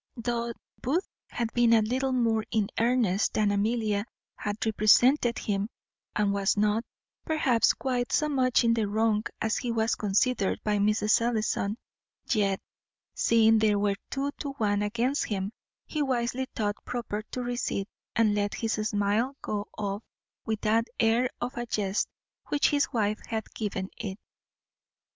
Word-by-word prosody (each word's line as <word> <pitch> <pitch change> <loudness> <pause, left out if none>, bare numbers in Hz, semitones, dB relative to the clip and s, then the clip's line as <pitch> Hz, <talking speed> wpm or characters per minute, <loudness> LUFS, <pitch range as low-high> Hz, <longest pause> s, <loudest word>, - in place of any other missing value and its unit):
Though 235 0 -2 0.3
Booth 320 +9 0 0.2
had 235 -2 -3
been 240 -1 +4
a 225 -1 +5
little 260 +4 0
more 230 -3 +2
in 210 -3 0
earnest 230 -4 +2
than 210 -1 +3
Amelia 210 0 0 0.3
had 205 +1 -3
represented 235 +4 +4
him, 205 0 -1 0.5
and 205 -1 +2
was 200 +1 +1
not, 210 +2 +2 0.4
perhaps, 275 -7 +3
quite 250 -2 -2
so 305 - +2
much 260 -5 +2
in 230 0 +4
the 225 -2 +1
wrong 215 +1 +2 0.2
as 220 0 +1
he 245 - -2
was 225 0 +1
considered 205 +1 +1
by 210 -1 +1
Mrs. 210 +2 +3
Ellison, 220 -2 0 0.5
yet, 200 -4 +2 0.5
seeing 225 -1 +4
there 215 -1 +3
were 200 0 +2 0.2
two 275 +1 -1
to 280 -2 -4
one 205 -5 0
against 235 +7 0
him, 195 -1 -2 0.3
he 305 - -3
wisely 260 -1 0
thought 205 -2 -2
proper 235 -4 -3
to 250 - -4
recede, 240 -5 -2 0.3
and 225 -2 +3
let 205 0 0
his 225 -1 -1
simile 215 +4 0
go 210 0 -3
off 200 0 -2 0.5
with 220 -1 -1
that 225 +2 +2
air 235 +3 +3
of 245 +1 -3
a 240 0 -4
jest 205 -3 0 0.4
which 290 - +2
his 290 -1 +1
wife 215 -3 0
had 220 -1 -4
given 200 -3 -3
it. 195 -3 -5
225 Hz, 155 wpm, -28 LUFS, 210-245 Hz, 0.5 s, a